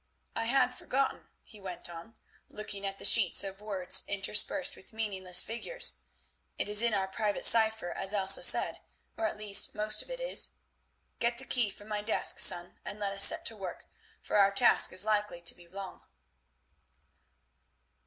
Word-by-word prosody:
"I 230 - -2
had 250 +1 +1
forgotten," 265 +2 -4
he 215 - -16
went 185 -3 -7
on, 175 +6 -12 0.3
looking 200 -1 -7
at 195 0 -7
the - - -5
sheets 205 -5 +5
of 195 0 -8
words 195 -4 +2
interspersed 210 +8 0
with 190 - -17
meaningless 190 -5 +1
figures; 370 - -3 0.6
"it - - -2
is 210 +1 +6
in 235 -2 +1
our 190 -1 -2
private 205 +2 -3
cypher, 220 -5 +4
as 195 - -2
Elsa 195 -2 +1
said, - - +4 0.4
or 220 - -2
at - - -7
least 205 -2 +2
most 215 0 -1
of - - -13
it - - -7
is. - - -1 0.7
Get 235 0 -1
the 265 - -10
key 240 -6 -1
from 205 +1 -14
my 210 -1 -4
desk, 215 +2 -2
son, 175 0 +2
and 205 - -8
let 200 -1 -4
us 195 0 +4
set - - +2
to 225 - 0
work, 195 -3 -9 0.3
for - - -3
our 200 -1 +4
task 200 - +3
is 185 - +1
likely 210 -4 -2
to 170 - +1
be 175 -1 -19
long." 190 +1 -10
210 Hz, 175 wpm, -29 LUFS, 195-225 Hz, 0.7 s, is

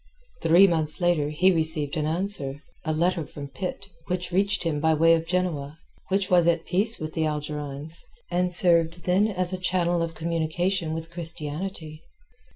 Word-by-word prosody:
Three 170 +3 +6
months 160 -4 +1
later 175 -5 +2
he 180 +5 +3
received 160 -3 0
an 155 -1 -1
answer—a 155 -4 -2
letter 170 +2 +1
from 140 -1 -9
Pitt, 185 +7 -6 0.2
which 180 0 -3
reached 195 +1 +1
him 160 -3 -1
by 160 +1 +3
way 165 +2 +5
of 165 0 0
Genoa—which 180 +2 -3
was 175 -2 +5
at 165 -1 +2
peace 205 +6 +1
with 155 0 -5
the 160 -1 0
Algerines, 150 +1 -5 0.3
and 180 0 +1
served 170 -1 +3
then 185 +4 +3
as 185 -3 -2
a 185 - -3
channel 175 -2 +1
of 165 0 -3
communication 165 +1 -1
with 165 0 -6
Christianity. 160 -1 -5
165 Hz, 160 wpm, -25 LUFS, 155-180 Hz, 0.3 s, Three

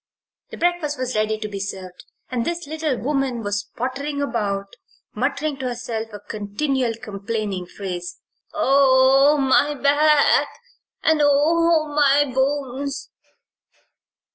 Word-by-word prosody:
The - - -9
breakfast 345 -4 0
was 255 -2 -3
ready 215 0 0
to 215 0 -5
be 200 -1 -6
served 190 -2 -7 0.3
and 245 -2 -1
this 340 +4 -3
little 310 -3 -2
woman 265 -3 -1
was 205 0 -3
pottering 280 +4 -3
about, 200 -8 -2 0.4
muttering 280 +5 -2
to 265 -1 -3
herself 230 -2 -4
a 205 - -8
continual 230 +5 -2
complaining 205 -4 -4
phrase: 180 -2 -6 0.3
"Oh, 270 +1 +4
my 285 +2 +3
back 290 +1 +4 0.6
and 315 -1 +3
oh, 315 +3 +3
my 290 -1 +4
bones!" 275 +1 -2
265 Hz, 115 wpm, -22 LUFS, 215-290 Hz, 0.6 s, Oh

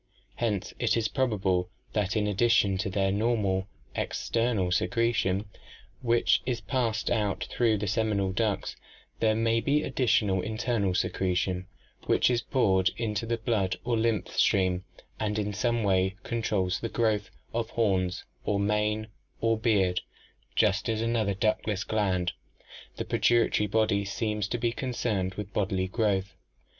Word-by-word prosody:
Hence 105 -5 -1
it - - +2
is 110 -1 +1
probable 100 -8 0 0.2
that 105 -1 0
in 105 - +1
addition 105 -1 +3
to 95 - -1
their 95 0 +1
normal 100 -3 +1 0.3
"ex - - -3
ternal 115 -6 +2
secretion" 110 -1 +1 0.6
which 120 -1 +3
is 125 -2 -1
passed 115 +1 -1
out 105 -4 0
through 115 -3 +2
the 105 - -3
seminal 100 -1 0
ducts, 105 0 -1 0.4
there 110 -1 +3
may 115 +1 +2
be 145 +3 +2
an - - -4
additional 110 -7 +2
"internal 110 -3 -1
secretion" 90 0 0 0.4
which - - +3
is 120 -1 +1
poured 95 -8 +2
into 115 -1 -2
the 115 0 0
blood 105 -5 0
or 120 -1 0
lymph 115 -1 0
stream 95 -1 +2 0.3
and 105 -1 -1
in 105 -1 -1
some 120 +3 0
way 95 -1 +2
controls 105 -6 -1
the 115 - -3
growth 110 -5 0 0.2
of 115 0 -1
horns 95 -5 0 0.2
or 100 -1 0
mane 105 +1 +1 0.3
or 115 0 +2
beard, 100 -5 +2 0.5
just 105 0 +2
as 110 -1 0
another 110 -4 0
ductless 105 -1 0
gland, 95 -5 0 0.6
the - - -4
pituitary 120 -3 +2
body, 105 -1 +2
seems 105 0 -2
to 120 - -2
be 120 0 0
concerned 110 -7 -2
with 105 -1 -6
bodily 95 -2 0
growth. 100 -2 0
105 Hz, 145 wpm, -28 LUFS, 95-115 Hz, 0.6 s, addition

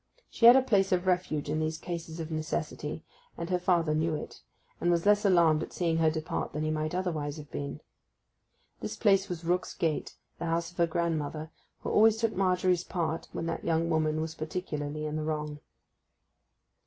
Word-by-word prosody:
She 230 - +5
had 240 - +11
a 265 - +5
place 195 -6 +2
of 180 0 +2
refuge 180 -5 0
in 155 +2 -1
these 155 0 -1
cases 170 -1 -6
of 160 0 -5
necessity, 155 0 -3 0.3
and 170 - -4
her 180 - +2
father 170 -3 +2
knew 160 +1 +1
it, - - -7 0.4
and 175 - +1
was 170 0 +2
less 210 +1 +4
alarmed 170 -5 +5
at - - -6
seeing 165 -2 0
her 160 -1 +4
depart 155 0 -3
than 150 - -2
he 155 - 0
might 155 +2 -2
otherwise 160 -5 -2
have 150 -2 -10
been. 145 +2 -5 1.0
This - - -4
place 195 -3 +3
was 170 -2 -5
Rook's 180 +2 0
Gate, 160 -3 -1 0.2
the - - -3
house 165 +1 -1
of 175 - -23
her 170 -1 +3
grandmother, 160 -2 -2 0.3
who - - -3
always 220 +1 +5
took 225 -1 0
Margery's 180 -1 +2
part 165 -3 -2
when - - -4
that 165 0 -3
young 165 0 +1
woman 155 -1 +1
was 160 0 -3
particularly 155 -2 -4
in 155 0 -2
the 155 - -2
wrong. 150 -1 -3
165 Hz, 190 wpm, -29 LUFS, 155-180 Hz, 1.0 s, had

